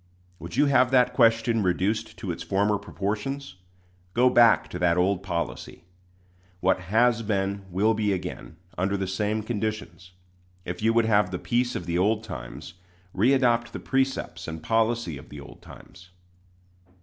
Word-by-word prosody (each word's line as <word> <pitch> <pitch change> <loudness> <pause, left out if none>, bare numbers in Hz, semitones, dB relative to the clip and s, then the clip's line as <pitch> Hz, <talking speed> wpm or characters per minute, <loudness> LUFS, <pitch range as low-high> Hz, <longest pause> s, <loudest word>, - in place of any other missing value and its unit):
Would 85 +1 -8
you - - +5
have 130 -3 +4
that 125 -1 +3
question 115 -1 +3
reduced 95 +3 -1
to - - -4
its - - -6
former 100 +1 +1
proportions? 105 +3 -4 0.6
Go 125 +2 +4
back 120 -2 +5
to - - -6
that 85 -1 +2
old 90 +1 +1
policy. 85 -3 -5 0.8
What 95 +1 +2
has 115 +2 +3
been 100 -2 -2
will 100 +5 +2
be 105 -2 0
again, 90 -3 -5 0.2
under 95 +2 0
the 95 - -2
same 105 +3 -2
conditions. 105 -4 -5 0.5
If 90 +2 -5
you 110 +1 +3
would 115 0 +3
have 105 -3 +3
the 90 - -3
peace 120 +5 -1
of 90 - -4
the 85 0 -1
old 105 +3 +1
times, 65 - -8 0.4
readopt 120 +1 +2
the - - -5
precepts 135 0 -2
and 80 -1 -7
policy 115 - 0
of - - -15
the 75 - -9
old 70 - -13
times. 90 0 -15
105 Hz, 160 wpm, -26 LUFS, 90-115 Hz, 0.8 s, you